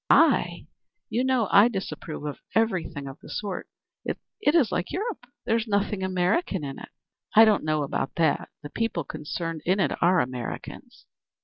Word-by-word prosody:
"I? - - +4 0.4
You 245 - 0
know 260 -4 +2
I 205 +3 +8
disapprove 190 -8 -5
of 145 - -4 0.2
everything 185 -10 0
of 135 - -9
the - - -13
sort. 200 -3 -4 0.4
It - - -2 0.4
is 280 -10 +4
like 180 - -1
Europe. 425 +7 -4 0.2
There's 230 0 +1
nothing 200 -1 0
American 190 - 0
in 135 -1 -5
it." - - -10 0.5
"I 220 +1 +10
don't 215 -2 +3
know 155 -1 +1
about 135 0 -3
that. 160 -3 +1
The 145 - -8
people 225 -8 -1
concerned 165 +2 -5
in 185 +3 +2
it - - +2
are 180 +1 +5
Americans. 125 -4 -5
185 Hz, 165 wpm, -26 LUFS, 155-225 Hz, 0.5 s, I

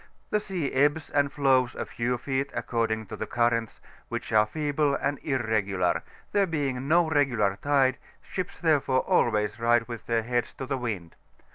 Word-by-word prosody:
The 210 - +3
sea 185 -9 -3
ebbs 145 +3 +2
and 145 -1 +2
flows 130 -3 +2
a - - -3
few 125 +1 -2
feet, 135 +2 -2
according 110 -2 -1
to - - -7
the - - -5
currents, 120 -2 0 0.3
which - - -4
are 110 0 +5
feeble 145 +1 0
and 140 0 -1
irregular; 105 - 0 0.3
there 200 -1 +3
being 140 -5 -2
no 170 +2 +4
regular 125 -10 +2
tide, 135 -3 +2 0.2
ships 185 +1 -5
therefore 145 -6 +2
always 105 -1 +1
ride 115 0 +3
with 120 -2 -8
their 115 -1 +1
heads 120 +1 -1
to 130 - -5
the 135 0 -2
wmd. 100 -9 -4
130 Hz, 165 wpm, -27 LUFS, 115-145 Hz, 0.3 s, are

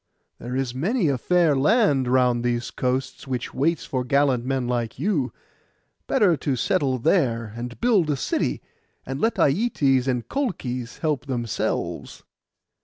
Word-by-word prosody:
There 125 +2 -5
is 130 -2 -1
many 175 - 0
a 135 - +1
fair 175 -3 +3
land 145 - +3
round 125 -1 +2
these 120 0 -1
coasts, 130 +2 -2
which 125 -2 -3
waits 160 +4 0
for 130 -2 -2
gallant 135 -1 +2
men 130 -1 -1
like 120 -2 -2
you. 150 - 0 0.8
Better 205 -10 +3
to 140 -2 -1
settle 140 - +1
there, 115 - +1
and 120 0 -6
build 215 -10 +3
a 145 - +2
city, - - -1 0.4
and 135 +2 -5
let 225 - +2
Aietes 140 - +2
and 125 -3 -1
Colchis 130 - -3
help 150 -3 -1
themselves. 120 -5 -3
135 Hz, 145 wpm, -24 LUFS, 125-165 Hz, 0.8 s, fair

